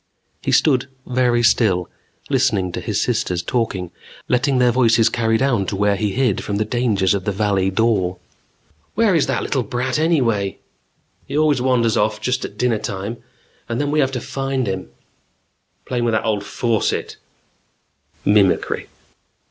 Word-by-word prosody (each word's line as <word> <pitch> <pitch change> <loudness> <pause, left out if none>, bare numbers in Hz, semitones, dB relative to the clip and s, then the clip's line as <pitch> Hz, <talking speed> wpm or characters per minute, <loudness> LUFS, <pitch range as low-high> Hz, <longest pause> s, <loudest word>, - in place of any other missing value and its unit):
He - - -1
stood 130 -3 +3 0.2
very 125 -2 +1
still, 95 -6 +3 0.4
listening 120 -9 +1
to - - -5
his - - -2
sisters 90 -1 -1
talking, 95 -6 -2 0.4
letting 130 +2 +1
their 125 -1 +4
voices 115 -2 +4
carry 115 -1 +1
down 120 -7 +1
to 100 - -2
where 100 +1 +2
he 100 0 -1
hid 125 -6 +1
from 100 - -3
the 105 +1 0
dangers 110 -5 +1
of 100 -2 -2
the 105 - 0
Valley 100 -1 +1
Dor. 95 -3 +1 0.8
"Where 225 -4 +3
is 160 -4 +2
that - - -1
little 135 - 0
brat, 125 +4 -2
anyway?" 120 - +1 0.7
"He 140 - -3
always 150 -4 +3
wanders 120 -4 +2
off 105 +1 +1
just 125 +4 -1
at - - -7
dinnertime 110 -2 -2 0.5
and 115 - -2
then 145 0 0
we 155 - +1
have 135 -2 +2
to 125 - -3
find 135 -1 -2
him 95 -7 -4 0.5
" - - -47
"Playing 120 -2 -1
with 115 - +1
that 110 - 0
old 105 -2 0
faucet 115 0 -1 0.6
" - - -39
Mimicry. 100 -3 +2
115 Hz, 165 wpm, -20 LUFS, 100-130 Hz, 0.8 s, their